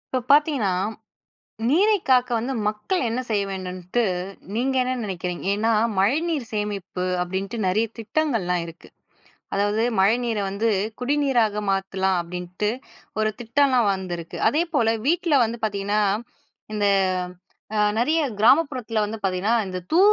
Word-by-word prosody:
இப்ப 250 Hz, -2 st, -1 dB
பார்த்தீங்கன்னா 285 Hz, -9 st, +4 dB, 1.0 s
நீரை 410 Hz, +8 st, +4 dB
காக்க 250 Hz, -1 st, +4 dB
வந்து 245 Hz, +4 st, -2 dB, 0.2 s
மக்கள் 215 Hz, -, -1 dB
என்ன 230 Hz, +3 st, -1 dB
செய்ய 205 Hz, -2 st, +2 dB
வேண்டுன்ட்டு 185 Hz, +3 st, -3 dB, 0.5 s
நீங்க 260 Hz, +4 st, 0 dB
என்ன 255 Hz, 0 st, -1 dB
நினைக்கிறீங்க? 180 Hz, -3 st, -4 dB
ஏன்னா, 225 Hz, +3 st, +1 dB, 0.3 s
மழைநீர் 285 Hz, -, +1 dB
சேமிப்பு 205 Hz, -3 st, -3 dB, 0.2 s
அப்படின்ட்டு 190 Hz, +5 st, -4 dB
நிறைய 210 Hz, +5 st, +2 dB
திட்டங்கள்லாம் 220 Hz, -, 0 dB
இருக்கு. 165 Hz, -1 st, -13 dB, 0.6 s
அதாவது 205 Hz, +3 st, +1 dB, 0.2 s
மழைநீரை 225 Hz, +1 st, +2 dB
வந்து, 215 Hz, +4 st, 0 dB, 0.3 s
குடிநீராக 250 Hz, -6 st, +1 dB
மாத்துலாம் 190 Hz, -1 st, 0 dB
அப்படின்ட்டு 180 Hz, +4 st, -3 dB, 0.5 s
ஒரு 215 Hz, 0 st, +1 dB
திட்டம்லாம் 245 Hz, -2 st, +3 dB
வந்திருக்கு. 175 Hz, -3 st, -6 dB
அதேபோல 290 Hz, -7 st, +1 dB
வீட்ல 335 Hz, -2 st, +2 dB
வந்து 230 Hz, +1 st, -5 dB
பார்த்தீங்கன்னா, 205 Hz, 0 st, 0 dB, 0.7 s
இந்த 205 Hz, -1 st, +1 dB, 0.9 s
அ -, -, +1 dB, 0.2 s
நிறைய 300 Hz, +8 st, +2 dB, 0.2 s
கிராமப்புறத்தில 250 Hz, -2 st, +3 dB
வந்து 215 Hz, +2 st, -5 dB
பார்த்தீங்கன்னா, 195 Hz, +4 st, +1 dB
இந்த 185 Hz, -1 st, -4 dB
தூ 325 Hz, -, +3 dB
220 Hz, 120 wpm, -23 LUFS, 195-255 Hz, 1.0 s, பார்த்தீங்கன்னா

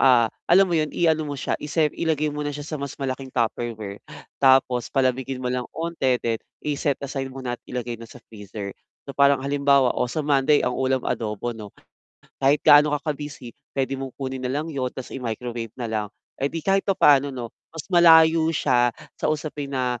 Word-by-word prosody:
ah, 125 Hz, -4 st, +5 dB, 0.2 s
alam 190 Hz, +2 st, +6 dB
mo 175 Hz, -, 0 dB
yun, 155 Hz, -2 st, 0 dB
iano 160 Hz, -2 st, +2 dB
mo 145 Hz, -, -3 dB
siya, 135 Hz, -, -2 dB
isep 150 Hz, 0 st, 0 dB
ilagay 155 Hz, -2 st, 0 dB
mo 150 Hz, -, -4 dB
na 145 Hz, -, -2 dB
siya 145 Hz, 0 st, -6 dB
sa 155 Hz, -, -3 dB
mas 140 Hz, 0 st, -4 dB
malaking 130 Hz, -1 st, -4 dB
Tupperware 115 Hz, -3 st, -2 dB, 0.4 s
tapos 130 Hz, -3 st, +3 dB
palamigin 130 Hz, -1 st, 0 dB
mo 125 Hz, -, -2 dB
lang 125 Hz, 0 st, -2 dB
'onti 160 Hz, -7 st, -1 dB
then 115 Hz, -1 st, 0 dB, 0.2 s
i-set 145 Hz, -1 st, -1 dB
aside 135 Hz, -1 st, -4 dB
mo 135 Hz, -, -8 dB
na 120 Hz, -1 st, -3 dB
at -, -, -46 dB
ilagay 120 Hz, -1 st, -4 dB
na 115 Hz, -, -10 dB
sa 125 Hz, -, -13 dB
freezer. 105 Hz, -2 st, -7 dB, 0.4 s
So, 140 Hz, -, -6 dB
parang 140 Hz, -1 st, +5 dB
halimbawa, 140 Hz, -1 st, +3 dB
oh, -, -, +1 dB
sa 155 Hz, -, -2 dB
Monday 145 Hz, 0 st, +3 dB
ang 125 Hz, -, -1 dB
ulam 130 Hz, 0 st, +1 dB
adobo 110 Hz, +1 st, -2 dB
'no. 105 Hz, -2 st, -9 dB, 0.7 s
Kahit 140 Hz, +2 st, +4 dB
gaano 145 Hz, +1 st, +8 dB
ka 150 Hz, +1 st, -2 dB
ka-busy, 145 Hz, -5 st, -9 dB, 0.2 s
puwede 135 Hz, 0 st, 0 dB
mong 135 Hz, -1 st, -5 dB
kunin 130 Hz, -1 st, -4 dB
na 125 Hz, -, -2 dB
lang 145 Hz, +4 st, -2 dB
yun 130 Hz, -4 st, -2 dB
tapos 130 Hz, -, -8 dB
i -, -, -4 dB
microwave 115 Hz, 0 st, -4 dB
na 120 Hz, -, -3 dB
lang. 110 Hz, -2 st, -2 dB, 0.4 s
Eh, 140 Hz, -, +1 dB
di 165 Hz, -, -4 dB
kahit 195 Hz, +4 st, +1 dB
papaano 145 Hz, -7 st, +4 dB
'no 125 Hz, -3 st, -7 dB, 0.2 s
mas 160 Hz, -2 st, -8 dB
malayo 165 Hz, -2 st, +7 dB
siya 125 Hz, -6 st, +2 dB, 0.2 s
sa -, -, -1 dB
usapin 150 Hz, -2 st, -4 dB
na, 125 Hz, -3 st, -1 dB
135 Hz, 200 wpm, -24 LUFS, 125-150 Hz, 0.7 s, gaano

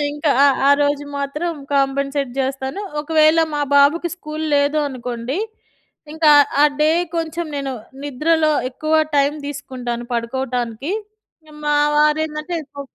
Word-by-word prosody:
ఇంకా 295 Hz, +1 st, -1 dB
ఆ -, -, +7 dB, 0.2 s
ఆ -, -, +6 dB
రోజు 290 Hz, 0 st, +1 dB
మాత్రం 300 Hz, +5 st, -2 dB, 0.2 s
కంపెన్సేట్ 275 Hz, 0 st, 0 dB
జేస్తాను. 265 Hz, +5 st, -2 dB, 0.2 s
ఒకవేళ 310 Hz, +1 st, +3 dB, 0.2 s
మా 295 Hz, -, -1 dB, 0.2 s
బాబుకి 300 Hz, +5 st, +4 dB
స్కూల్ 310 Hz, -2 st, -6 dB
లేదు 285 Hz, +2 st, +2 dB
అనుకోండి. 250 Hz, +2 st, -4 dB, 0.7 s
ఇంకా 315 Hz, -1 st, +2 dB
ఆహ్, 285 Hz, -, +2 dB
ఆ -, -, +7 dB, 0.2 s
డే 305 Hz, -, +4 dB, 0.3 s
కొంచెం 330 Hz, +1 st, -3 dB
నేను, 275 Hz, -1 st, -3 dB, 0.3 s
నిద్రలో 310 Hz, +3 st, +1 dB, 0.2 s
ఎక్కువ 310 Hz, +4 st, -2 dB, 0.2 s
టైమ్ 285 Hz, +2 st, +2 dB
తీసుకుంటాను 255 Hz, -4 st, -5 dB
పడుకోవటానికి. 245 Hz, -, -3 dB, 0.7 s
మా 295 Hz, 0 st, +2 dB, 0.2 s
వారు 300 Hz, +1 st, +4 dB
ఏందంటే, 305 Hz, +3 st, -5 dB, 0.2 s
పో 280 Hz, -, -7 dB
285 Hz, 130 wpm, -19 LUFS, 270-310 Hz, 0.7 s, ఆ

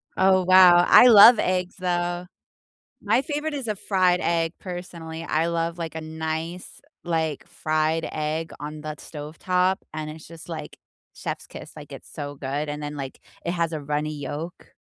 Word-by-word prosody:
Oh, 185 Hz, 0 st, +4 dB
wow, 180 Hz, -1 st, +7 dB
I 250 Hz, -, +8 dB
love 230 Hz, +1 st, +9 dB
eggs, 180 Hz, -1 st, -1 dB
though. 175 Hz, -1 st, -1 dB, 0.8 s
My 260 Hz, -, +2 dB
favorite 295 Hz, +1 st, -3 dB
is 270 Hz, -5 st, -4 dB
a 215 Hz, -, -1 dB
fried 185 Hz, -3 st, +2 dB
egg, 165 Hz, 0 st, 0 dB
personally, 170 Hz, -3 st, -7 dB
I 160 Hz, +1 st, 0 dB
love, 170 Hz, 0 st, -2 dB
like, 165 Hz, -2 st, -5 dB
a 160 Hz, -, -4 dB
nice, 160 Hz, +2 st, -5 dB, 0.2 s
like, 160 Hz, -4 st, -2 dB
fried 155 Hz, +1 st, -1 dB
egg 155 Hz, +1 st, -3 dB
on 150 Hz, +1 st, -7 dB
the 155 Hz, 0 st, -5 dB
stovetop, 180 Hz, +6 st, -1 dB, 0.2 s
and 155 Hz, -1 st, -5 dB
it's 155 Hz, 0 st, -10 dB
just, 165 Hz, +1 st, -12 dB
like, 160 Hz, -, -7 dB, 0.4 s
chef's -, -, -6 dB
kiss, -, -, -10 dB
like, -, -, -11 dB
it's -, -, -11 dB
so 145 Hz, 0 st, -6 dB
good, 140 Hz, +2 st, -3 dB
and 150 Hz, 0 st, -5 dB
then, 145 Hz, 0 st, -5 dB
like, 135 Hz, -2 st, -7 dB, 0.3 s
it 170 Hz, -, 0 dB
has 170 Hz, -2 st, -1 dB
a 155 Hz, -, -4 dB
runny 150 Hz, +1 st, -2 dB
yolk. 150 Hz, +4 st, -7 dB
165 Hz, 170 wpm, -24 LUFS, 155-180 Hz, 0.8 s, love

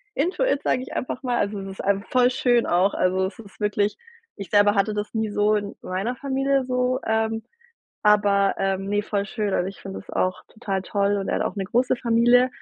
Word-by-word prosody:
into 345 Hz, -, 0 dB
it, -, -, +1 dB
sage 255 Hz, -, +1 dB
ich 260 Hz, -, -8 dB
einfach 250 Hz, -, -3 dB
mal. 245 Hz, -2 st, 0 dB
Also 205 Hz, 0 st, -1 dB
es 195 Hz, -, -7 dB
ist -, -, -1 dB
ein 200 Hz, 0 st, +1 dB
voll 250 Hz, 0 st, +4 dB
schön 245 Hz, -2 st, +2 dB
auch, 180 Hz, +3 st, +2 dB
also 185 Hz, +1 st, +1 dB
es 190 Hz, -, -10 dB
ist 205 Hz, -3 st, -14 dB
wirklich 210 Hz, 0 st, 0 dB, 0.4 s
ich 195 Hz, -3 st, -8 dB
selber 205 Hz, 0 st, +5 dB
hatte 200 Hz, +1 st, +1 dB
das 210 Hz, 0 st, -4 dB
nie 220 Hz, -1 st, -1 dB
so 210 Hz, +1 st, +2 dB
in 205 Hz, -1 st, -3 dB
meiner 195 Hz, +7 st, -2 dB
Familie 270 Hz, 0 st, 0 dB
so, 250 Hz, 0 st, 0 dB
ähm, 220 Hz, 0 st, 0 dB, 0.6 s
aber, 205 Hz, -1 st, +4 dB
ähm, 195 Hz, 0 st, -1 dB
ne, 205 Hz, +1 st, +1 dB
voll 200 Hz, -1 st, -2 dB
schön, 210 Hz, -1 st, -2 dB
also 180 Hz, -, +1 dB
ich 195 Hz, -, -10 dB
finde 195 Hz, 0 st, -6 dB
das -, -, -13 dB
auch 185 Hz, 0 st, -1 dB
total 195 Hz, -4 st, -3 dB
toll 200 Hz, +1 st, 0 dB
und 195 Hz, -, -3 dB
er -, -, 0 dB
hat -, -, 0 dB
auch -, -, -3 dB
'ne 195 Hz, -, -2 dB
große 245 Hz, +6 st, +1 dB
Familie. 240 Hz, +1 st, +4 dB
210 Hz, 225 wpm, -24 LUFS, 200-245 Hz, 0.6 s, selber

